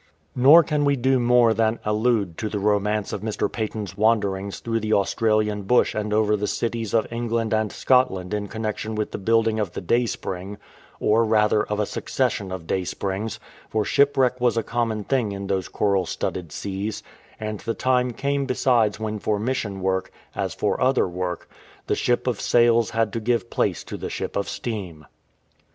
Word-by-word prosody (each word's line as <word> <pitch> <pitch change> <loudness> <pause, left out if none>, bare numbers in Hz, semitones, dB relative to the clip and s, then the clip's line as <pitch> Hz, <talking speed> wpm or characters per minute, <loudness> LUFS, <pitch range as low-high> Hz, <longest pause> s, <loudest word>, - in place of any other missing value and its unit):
Nor 145 +7 +8
can 150 -1 0
we 140 0 +3
do 130 0 +2
more 120 -1 +4
than 110 +1 +1
allude 105 -4 +1
to 110 - -2
the 105 - -3
romance 105 0 0
of 100 - -4
Mr. 110 -1 -2
Paton"'s 110 -4 -4
wanderings 100 -2 +1
through 115 -1 -1
the 110 0 -1
Australian 105 +1 +1
bush 120 +5 +2
and 105 0 -3
over 105 0 +3
the 105 0 -2
cities 115 -1 -2
of 110 - +3
England 115 -1 -1
and 110 -2 +1
Scotland 115 -8 +1
in 105 -1 -2
connexion 110 0 -4
with 105 0 -2
the - - -5
building 115 +1 +2
of 100 -5 -2
the - - -4
Dai/spring, 100 -2 -2 0.4
or 110 +2 +3
rather 105 -1 +3
of 105 0 -3
a 105 - +2
succession 100 -1 -2
of 95 -3 -6
Daysprings, 95 +4 -3 0.3
for 110 -1 0
shipwreck 130 -2 +2
was 120 -1 +2
a 115 - +1
common 115 -2 -1
thing 120 -4 0
in 100 0 -5
those 95 -1 -1
coral 100 -4 0
studded 85 -1 -4
seas, 100 +5 -4 0.4
and 110 -1 -4
the 115 - -3
time 125 -1 +1
came 140 +3 -1
besides 120 -5 +2
when 110 -1 -3
for 105 0 0
mission 105 -4 -2
work, 95 0 -1 0.2
as - - -3
for - - -1
other 130 -3 +3
work, 90 0 -4 0.4
the - - 0
ship 120 - 0
of 125 -5 -1
sails 120 -1 +4
had 115 -2 0
to 115 - -1
give 115 -3 -1
place - - 0
to - - -7
the - - -5
ship - - -4
of 100 - -1
steam. 95 -10 -5
110 Hz, 180 wpm, -23 LUFS, 100-120 Hz, 0.4 s, Nor